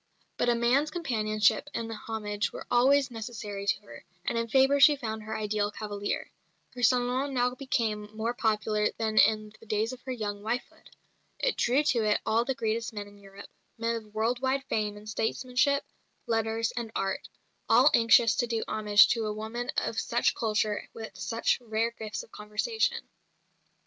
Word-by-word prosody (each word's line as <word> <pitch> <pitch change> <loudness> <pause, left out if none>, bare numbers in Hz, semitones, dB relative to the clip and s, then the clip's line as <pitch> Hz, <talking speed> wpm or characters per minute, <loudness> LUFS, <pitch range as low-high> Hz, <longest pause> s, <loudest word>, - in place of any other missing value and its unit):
But 240 - +1
a 240 - +4
man's 250 +6 +2
companionship 220 -6 +1
and 225 -1 -3
homage 210 -1 -3
were - - -8
always 270 +2 +4
necessary 215 -3 -6
to - - +1
her, 205 - -13 0.2
and - - -1
in 230 0 0
Fabre 270 +4 +4
she 295 +1 +8
found 220 -5 -5
her 220 +1 -5
ideal 210 -1 0
cavalier. 205 -1 -4 0.4
Her 250 - -7
salon 250 +3 +2
now 250 0 +2
became 225 -6 -2
more 230 +2 -1
popular 215 -2 0
even - - 0
than 220 -1 -1
in 215 -1 +3
the 225 - -17
days 215 +3 0
of 255 - -10
her 260 - -6
young 205 -4 -4
wifehood. 230 +4 -5 0.5
It - - 0
drew 260 +5 +2
to 240 -6 +2
it 210 -1 +2
all 225 +1 +2
the 265 - -1
greatest 230 +1 -2
men 205 -1 -6
in 205 0 -16
Europe, 195 0 -13 0.3
men 230 +1 -1
of 215 -2 -9
world 230 +3 0
wide 270 +1 0
fame 210 -5 -2
in 210 - -12
statesmanship, 250 +6 0 0.4
letters, 225 0 0
and 235 -2 -5
art, 195 0 -2 0.4
all - - +6
anxious 230 0 +5
to 240 - +1
do 230 -1 -1
homage 210 -1 +5
to 225 -2 0
a 210 - -2
woman 220 +3 -5
of - - 0
such - - +1
culture 215 -1 0
and - - -8
with 220 -3 -8
such 230 +5 0
rare 225 0 -1
gifts 215 -2 -6
of - - -18
conversation. 440 - -2
225 Hz, 180 wpm, -28 LUFS, 215-245 Hz, 0.5 s, she